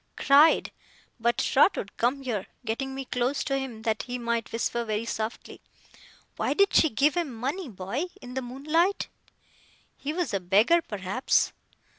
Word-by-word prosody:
Cried. 290 Hz, +3 st, +5 dB, 0.5 s
But, 235 Hz, +1 st, +1 dB
Trotwood, 200 Hz, -, +2 dB
come 260 Hz, +4 st, 0 dB
here,' 220 Hz, -7 st, -3 dB, 0.2 s
getting 265 Hz, +4 st, -3 dB
me 270 Hz, 0 st, -5 dB
close 250 Hz, +3 st, -1 dB
to 275 Hz, -3 st, -1 dB
him, 240 Hz, -5 st, -6 dB
that 220 Hz, -1 st, 0 dB
he 250 Hz, 0 st, -5 dB
might 235 Hz, -1 st, -2 dB
whisper 235 Hz, +1 st, -1 dB
very 215 Hz, 0 st, -2 dB
softly; 225 Hz, 0 st, -5 dB, 0.8 s
'why -, -, 0 dB
did 400 Hz, 0 st, +3 dB
she 315 Hz, -, +5 dB
give 285 Hz, +6 st, +2 dB
him 340 Hz, -6 st, -1 dB
money, 270 Hz, +8 st, -4 dB
boy, 200 Hz, -, -3 dB
in 250 Hz, -, -10 dB
the 265 Hz, -, -2 dB
moonlight?' 305 Hz, +10 st, 0 dB, 0.9 s
'He 285 Hz, -, -4 dB
was 330 Hz, -, -2 dB
a 195 Hz, -, +1 dB
beggar, 210 Hz, -, +4 dB
perhaps. 210 Hz, -, 0 dB
250 Hz, 155 wpm, -27 LUFS, 225-285 Hz, 0.9 s, Cried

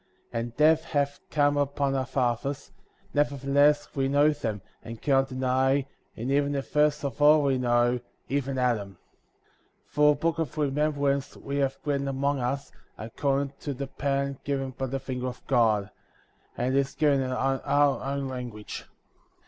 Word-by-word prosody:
45. 115 Hz, -, -2 dB
And 120 Hz, 0 st, -8 dB
death 155 Hz, +1 st, +5 dB
hath 145 Hz, -3 st, -1 dB
come 145 Hz, -1 st, +2 dB
upon 140 Hz, -1 st, 0 dB
our 130 Hz, -2 st, -1 dB
fathers; 130 Hz, +2 st, -1 dB, 0.4 s
never 145 Hz, -1 st, +2 dB
theless 145 Hz, +2 st, +3 dB
we 135 Hz, -1 st, +1 dB
know 145 Hz, +2 st, +4 dB
them, 110 Hz, -8 st, -3 dB, 0.2 s
and 115 Hz, 0 st, -8 dB
cannot 135 Hz, -2 st, +2 dB
deny, 130 Hz, +1 st, +1 dB, 0.3 s
and 120 Hz, +4 st, -3 dB
even 145 Hz, 0 st, +2 dB
the 140 Hz, -1 st, -1 dB
first 150 Hz, +1 st, +1 dB
of 140 Hz, +1 st, -4 dB
all 150 Hz, +1 st, +6 dB
we 135 Hz, -2 st, +2 dB
know, 120 Hz, 0 st, +2 dB, 0.3 s
even 135 Hz, -1 st, -1 dB
Adam.^ 110 Hz, -6 st, 0 dB, 0.9 s
46. -, -, -33 dB
For 150 Hz, 0 st, +5 dB
a -, -, +1 dB
book 165 Hz, +2 st, -1 dB
of 160 Hz, -5 st, -2 dB
remembrance^' 145 Hz, -1 st, 0 dB
we 140 Hz, 0 st, -4 dB
have 135 Hz, -1 st, 0 dB
written 140 Hz, -1 st, 0 dB
among 140 Hz, +1 st, 0 dB
us, 130 Hz, +3 st, -2 dB, 0.3 s
according 140 Hz, +5 st, -1 dB
to 145 Hz, -3 st, -4 dB
the 140 Hz, +2 st, -4 dB
pattern 140 Hz, 0 st, -2 dB
given 135 Hz, -2 st, -2 dB
by 130 Hz, +1 st, -4 dB
the 135 Hz, +2 st, -3 dB
finger 130 Hz, -1 st, -4 dB
of 125 Hz, -, -7 dB
God; 110 Hz, -5 st, +2 dB, 0.7 s
and 130 Hz, +2 st, 0 dB
it -, -, +5 dB
is 135 Hz, 0 st, -2 dB
given 145 Hz, -3 st, +3 dB
in 130 Hz, -1 st, -2 dB
our 135 Hz, +1 st, +1 dB
own 140 Hz, 0 st, -2 dB
language. 125 Hz, -5 st, -6 dB
135 Hz, 170 wpm, -27 LUFS, 130-145 Hz, 0.9 s, all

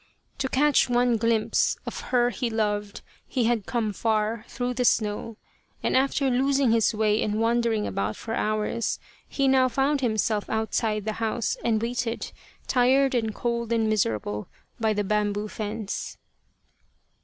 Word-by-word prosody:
To 265 Hz, -, -1 dB
catch 285 Hz, 0 st, +3 dB
one 245 Hz, -1 st, +3 dB
glimpse 225 Hz, -1 st, +1 dB
of -, -, -5 dB
her 245 Hz, -1 st, +3 dB
he 235 Hz, +3 st, -2 dB
loved 210 Hz, -2 st, -2 dB, 0.3 s
he 250 Hz, -, 0 dB
had 225 Hz, -3 st, 0 dB
come 225 Hz, -4 st, -1 dB
far 215 Hz, +1 st, 0 dB
through 245 Hz, +1 st, -3 dB
the 250 Hz, +1 st, -1 dB
snow, 215 Hz, -1 st, 0 dB, 0.5 s
and -, -, +1 dB
after 275 Hz, +1 st, +2 dB
losing 270 Hz, 0 st, +2 dB
his 225 Hz, -1 st, +3 dB
way 215 Hz, 0 st, +2 dB
and 210 Hz, 0 st, -1 dB
wandering 230 Hz, -1 st, +1 dB
about 100 Hz, +2 st, -2 dB
for 225 Hz, -, -6 dB
hours, 215 Hz, +1 st, -1 dB, 0.3 s
he 275 Hz, -1 st, +1 dB
now 260 Hz, -1 st, +4 dB
found 275 Hz, +3 st, +1 dB
himself 220 Hz, -3 st, 0 dB
outside 220 Hz, -1 st, -1 dB
the 215 Hz, -, -1 dB
house, 225 Hz, 0 st, 0 dB
and 225 Hz, -2 st, +2 dB
waited, 235 Hz, 0 st, -2 dB, 0.3 s
tired 265 Hz, +2 st, +3 dB
and 225 Hz, -3 st, -1 dB
cold 235 Hz, -1 st, -2 dB
and 225 Hz, -1 st, +2 dB
miserable, 105 Hz, -, -1 dB, 0.3 s
by 220 Hz, -1 st, +2 dB
the 210 Hz, -1 st, 0 dB
bam 210 Hz, 0 st, +1 dB
boo 205 Hz, +1 st, -3 dB
fence. 215 Hz, -1 st, -5 dB
225 Hz, 155 wpm, -26 LUFS, 215-245 Hz, 0.5 s, now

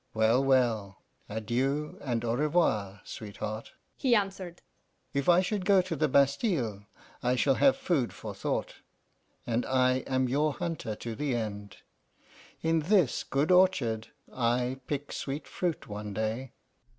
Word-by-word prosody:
'Well, 110 Hz, +4 st, +3 dB
well, 115 Hz, -7 st, +1 dB, 0.3 s
adieu 130 Hz, +7 st, -1 dB
and 120 Hz, -4 st, -2 dB
au 115 Hz, -, +1 dB
revoir, 120 Hz, -, +1 dB
sweetheart,' 110 Hz, +1 st, -6 dB, 0.2 s
he 250 Hz, -3 st, +3 dB
answered. 195 Hz, -4 st, -2 dB, 0.5 s
'If 140 Hz, +3 st, 0 dB
I 175 Hz, +1 st, +6 dB
should 195 Hz, +1 st, -2 dB
go 190 Hz, -1 st, +5 dB
to 180 Hz, -2 st, -3 dB
the 155 Hz, +1 st, +2 dB
Bastile, 140 Hz, -, +1 dB, 0.3 s
I 125 Hz, +1 st, +2 dB
shall 135 Hz, +2 st, +3 dB
have 270 Hz, -, +4 dB
food 170 Hz, -, 0 dB
for -, -, -7 dB
thought; -, -, -3 dB, 0.7 s
and 120 Hz, +1 st, 0 dB
I 130 Hz, -1 st, +3 dB
am 130 Hz, -1 st, +1 dB
your 145 Hz, +4 st, +1 dB
hunter 150 Hz, -9 st, -4 dB
to 115 Hz, +2 st, -6 dB
the 135 Hz, +1 st, -1 dB
end. 105 Hz, -3 st, -5 dB, 0.9 s
In 165 Hz, 0 st, +3 dB
this 175 Hz, -, +2 dB
good 145 Hz, +5 st, 0 dB
orchard 135 Hz, -13 st, +3 dB, 0.3 s
I 125 Hz, +1 st, 0 dB
pick 145 Hz, -1 st, -3 dB
sweet 140 Hz, +2 st, -4 dB
fruit 175 Hz, -3 st, -3 dB
one 105 Hz, -1 st, -6 dB
day. 110 Hz, +4 st, -2 dB
130 Hz, 140 wpm, -29 LUFS, 115-160 Hz, 0.9 s, I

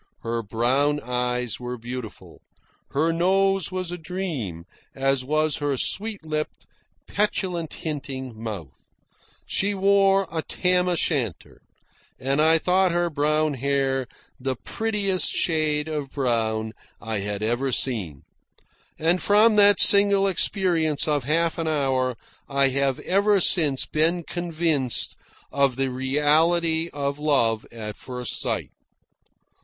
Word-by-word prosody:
Her 115 Hz, 0 st, -2 dB
brown 130 Hz, +7 st, +1 dB
eyes 125 Hz, -1 st, -2 dB
were 125 Hz, 0 st, -5 dB
beautiful. 120 Hz, -1 st, -9 dB, 0.5 s
Her 160 Hz, +4 st, 0 dB
nose 190 Hz, +1 st, +1 dB
was 185 Hz, -2 st, -4 dB
a 175 Hz, -, -6 dB
dream, 160 Hz, -, -5 dB, 0.3 s
as 135 Hz, -1 st, +1 dB
was 155 Hz, +2 st, 0 dB
her 145 Hz, -2 st, -1 dB
sweet 205 Hz, -, -1 dB
lipped, 155 Hz, -1 st, -4 dB, 0.4 s
petulant 185 Hz, -5 st, -1 dB
hinting 135 Hz, -5 st, -5 dB
mouth. 105 Hz, -, -8 dB, 0.6 s
She 200 Hz, +1 st, 0 dB
wore 195 Hz, 0 st, +3 dB
a 160 Hz, -1 st, -2 dB
tam 180 Hz, +2 st, +1 dB
o' 180 Hz, -, +1 dB
shanter, 135 Hz, -, -2 dB, 0.6 s
and 135 Hz, +3 st, 0 dB
I 160 Hz, +1 st, +5 dB
thought 185 Hz, +2 st, +2 dB
her 175 Hz, 0 st, 0 dB
brown 150 Hz, +1 st, +1 dB
hair 135 Hz, -1 st, 0 dB, 0.3 s
the 130 Hz, 0 st, -2 dB
prettiest 200 Hz, -, 0 dB
shade 155 Hz, -2 st, 0 dB
of 150 Hz, -3 st, -4 dB
brown 110 Hz, -5 st, -1 dB, 0.3 s
I 110 Hz, -2 st, -3 dB
had 100 Hz, +1 st, -4 dB
ever 120 Hz, +4 st, -1 dB
seen. 100 Hz, -, 0 dB, 0.7 s
And 170 Hz, +3 st, +1 dB
from 215 Hz, +2 st, +4 dB
that 205 Hz, -1 st, +6 dB
single 200 Hz, -1 st, +7 dB
experience 170 Hz, -5 st, +1 dB
of 145 Hz, -4 st, 0 dB
half 165 Hz, +3 st, 0 dB
an 165 Hz, -, -2 dB
hour 130 Hz, -5 st, 0 dB, 0.3 s
I 140 Hz, -1 st, +2 dB
have 135 Hz, 0 st, 0 dB
ever 200 Hz, +2 st, +2 dB
since 150 Hz, -7 st, +2 dB
been 165 Hz, +3 st, +1 dB
convinced 160 Hz, -7 st, -1 dB, 0.4 s
of 140 Hz, -2 st, +1 dB
the 135 Hz, 0 st, -1 dB
reality 160 Hz, +5 st, +1 dB
of 140 Hz, 0 st, -3 dB
love 120 Hz, -7 st, +1 dB
at 110 Hz, -2 st, -7 dB
first 125 Hz, -2 st, -4 dB
sight. -, -, -3 dB
150 Hz, 125 wpm, -24 LUFS, 130-175 Hz, 0.7 s, single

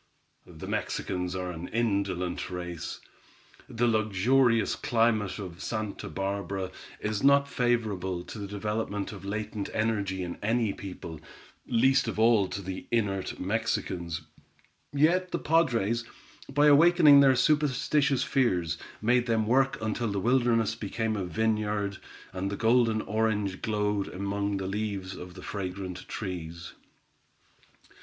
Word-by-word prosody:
The -, -, -10 dB
Mexicans 90 Hz, -1 st, -2 dB
are 90 Hz, -1 st, -3 dB
an 85 Hz, 0 st, -6 dB
indolent 100 Hz, -6 st, -1 dB
race. 90 Hz, -2 st, -5 dB, 0.7 s
The 120 Hz, +1 st, 0 dB
luxurious 115 Hz, +2 st, +3 dB
climate 115 Hz, -6 st, +1 dB
of 90 Hz, -4 st, -7 dB
Santa 110 Hz, -6 st, -4 dB
Barbara 95 Hz, +1 st, -3 dB, 0.3 s
is 105 Hz, -1 st, -2 dB
not 140 Hz, 0 st, +5 dB
favorable 105 Hz, -9 st, -1 dB
to 110 Hz, -, -9 dB
the 100 Hz, -, -5 dB
development 105 Hz, 0 st, -3 dB
of 100 Hz, -2 st, -9 dB
latent 105 Hz, 0 st, -3 dB
energy 100 Hz, -4 st, 0 dB
in 85 Hz, -1 st, -6 dB
any 115 Hz, -1 st, +1 dB
people, 90 Hz, -5 st, -8 dB, 0.5 s
least 130 Hz, +2 st, +3 dB
of 115 Hz, -, -3 dB
all 110 Hz, -3 st, +4 dB
to 100 Hz, +1 st, -5 dB
the 95 Hz, 0 st, -6 dB
inert 100 Hz, -5 st, -1 dB
Mexicans; 90 Hz, -5 st, -2 dB, 0.7 s
yet 170 Hz, +6 st, +3 dB
the -, -, -1 dB
padres, 120 Hz, -8 st, +2 dB, 0.5 s
by 145 Hz, +2 st, +4 dB
awakening 150 Hz, -1 st, +7 dB
their 135 Hz, -2 st, +6 dB
superstitious 140 Hz, -1 st, +2 dB
fears, 120 Hz, -, +1 dB, 0.2 s
made 120 Hz, +2 st, +3 dB
them 110 Hz, -2 st, +2 dB
work 135 Hz, +4 st, +2 dB
until 110 Hz, +2 st, -1 dB
the 100 Hz, -, -1 dB
wilderness 115 Hz, -1 st, +2 dB
became 110 Hz, 0 st, -2 dB
a 95 Hz, -3 st, -2 dB
vineyard, 105 Hz, 0 st, -1 dB, 0.3 s
and 95 Hz, +1 st, -2 dB
the 100 Hz, -, -4 dB
golden 115 Hz, -1 st, +3 dB
orange 105 Hz, -2 st, -1 dB
glowed 105 Hz, -2 st, 0 dB
amid 100 Hz, +1 st, -2 dB
the 95 Hz, -, -4 dB
leaves 100 Hz, -1 st, -3 dB
of 90 Hz, 0 st, -9 dB
the 95 Hz, -, -10 dB
fragrant 95 Hz, -2 st, -5 dB
trees. 85 Hz, -4 st, -6 dB
105 Hz, 130 wpm, -28 LUFS, 95-120 Hz, 0.7 s, awakening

